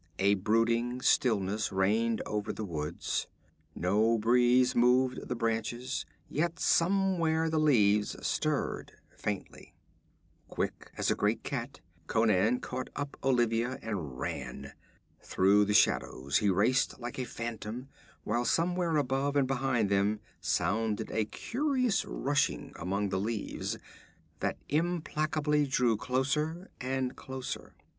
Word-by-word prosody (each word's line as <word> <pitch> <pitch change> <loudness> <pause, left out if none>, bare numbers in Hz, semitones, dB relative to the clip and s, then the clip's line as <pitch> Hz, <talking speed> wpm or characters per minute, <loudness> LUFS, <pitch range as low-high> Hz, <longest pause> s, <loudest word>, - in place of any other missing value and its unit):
A 100 +1 +4
brooding 115 +5 +1
stillness 105 -3 +2
reigned 110 +4 +1
over 105 -1 -2
the 110 - -5
woods. 80 -3 -3 0.5
No 105 +6 +2
breeze 125 +3 +4
moved 125 +2 +3
the 125 - -2
branches, 115 +3 -2 0.2
yet 165 +3 -1
somewhere 170 -3 +2
the 160 - +2
leaves 105 -9 +3
stirred - - -1 0.2
faintly. 105 -2 -5 0.7
Quick - - -4
as - - +1
a - - +2
great - - 0
cat - - -5 0.3
Conan 110 +1 +2
caught 130 0 -5
up 145 -1 -4
Olivia 120 -1 +1
and 85 - -4
ran. - - -5 0.5
Through 100 +2 +3
the 105 - 0
shadows 70 -7 +2
he 105 - +2
raced 110 +10 +2
like 120 +1 -6
a - - 0
phantom, 115 +1 -5 0.4
while 120 +3 0
somewhere 170 +4 +1
above 140 0 0
and 140 -2 +3
behind 125 -5 0
them 100 +2 +2 0.2
sounded 100 +5 0
a 110 - +1
curious 255 - 0
rushing - - -1
among 100 +4 -2
the 95 0 -1
leaves, 110 +1 -3 0.6
that - - -1
implacably 155 -2 0
drew 125 -3 +2
closer 150 - -1
and 130 0 -2
closer. 130 -1 -6
120 Hz, 120 wpm, -30 LUFS, 105-135 Hz, 0.7 s, A